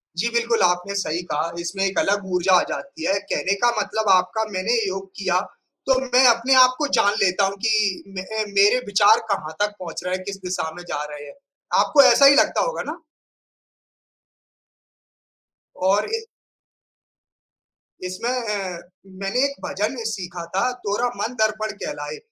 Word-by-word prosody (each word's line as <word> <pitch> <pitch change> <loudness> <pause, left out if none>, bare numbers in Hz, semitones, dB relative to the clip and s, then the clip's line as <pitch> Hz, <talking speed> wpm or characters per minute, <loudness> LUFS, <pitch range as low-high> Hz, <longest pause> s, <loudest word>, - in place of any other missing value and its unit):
जी, 215 +7 0
बिल्कुल 235 0 +1
आपने 180 +2 +1
सही 175 -4 -2
कहा 155 +3 -1
इसमें 175 +3 -3
एक 195 - 0
अलग 200 0 0
ऊर्जा 180 +1 +2
आ - - +1
जाती 280 +3 -6
है। - - +2 0.2
कहने 190 - 0
का 240 - +6
मतलब 210 +1 -1
आपका 205 +4 +2
मैंने 190 +5 0
योग 195 0 -5
किया 185 -2 +1 0.5
तो 265 -1 +3
मैं 255 0 +3
अपने 235 +2 +3
आप 255 0 +6
को 300 - 0
जान 215 -5 +4
लेता 190 +1 +2
हूँ 195 +1 -2
कि 215 -4 +1
मैं 185 - -4
अ, 220 +2 -3
मेरे 205 +4 +4
विचार 205 +2 +4
कहाँ 160 -5 -3
तक 205 0 0
पहुँच 175 -3 -7
रहे 180 0 -1
हैं, 185 - -7
किस 195 +1 -6
दिशा 180 -3 -3
में 175 - -9
जा 145 - -3
रहे 145 0 -9
हैं। - - -12 0.5
आपको 290 - +5
ऐसा 275 +1 +6
ही 280 +1 +8
लगता - - +3
होगा - - -2
ना? 325 - -8 2.8
और 195 +3 +1
ए 455 0 -6 1.8
इसमें 185 +6 -4
अ, 210 -8 -3 0.4
मैंने 195 +7 0
एक 280 0 -3
भजन 270 -5 -2
भी 230 -3 -6
सीखा 180 -5 -5
था, 200 +6 +1
तोरा 245 -1 -2
मन 235 - -2
दर्पण 215 0 0
कहलाए। 465 - -5
205 Hz, 170 wpm, -22 LUFS, 185-235 Hz, 2.8 s, ही